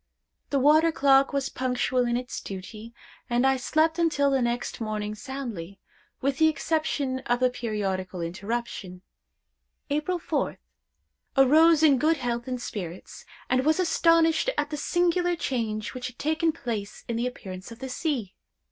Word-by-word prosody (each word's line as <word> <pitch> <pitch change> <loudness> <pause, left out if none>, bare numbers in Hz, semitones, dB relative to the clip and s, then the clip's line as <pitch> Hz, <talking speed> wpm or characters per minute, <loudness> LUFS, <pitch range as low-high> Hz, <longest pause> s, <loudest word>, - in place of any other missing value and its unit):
The 280 - +1
water 305 +4 +5
clock 275 -2 +4
was 275 -1 -1
punctual 255 -1 0
in 240 0 +1
its 250 0 -5
duty, 210 +4 -8 0.4
and 240 +2 +2
I 270 0 +4
slept 315 +5 +1
until 285 -4 +2
next 240 0 -2
morning 215 -1 -3
soundly, 215 -7 -6 0.4
with 275 0 0
the 315 - +6
exception 310 -4 -1
of 245 0 +2
the 255 0 +3
periodical 195 -6 -3
interruption. 190 +1 -4 0.9
"April 305 +5 0
4th. - - -2 0.8
Arose 310 +4 +6
in 280 -5 +6
good 315 +3 +3
health 240 -2 -3
and 250 -1 -3
spirits, 185 -7 -7 0.2
and 255 +1 +2
was 310 +4 +2
astonished 330 +1 +3
at 295 +1 -1
the - - -2
singular 350 +2 +1
change 225 -8 -2
which 250 -1 -4
had 250 - -11
taken 315 +2 +1
place 230 -10 -5
in 235 - -2
the 235 +2 0
appearance 190 -5 -8
of 230 - -9
the 265 +2 -6
sea. 255 - -2
255 Hz, 150 wpm, -26 LUFS, 225-305 Hz, 0.9 s, the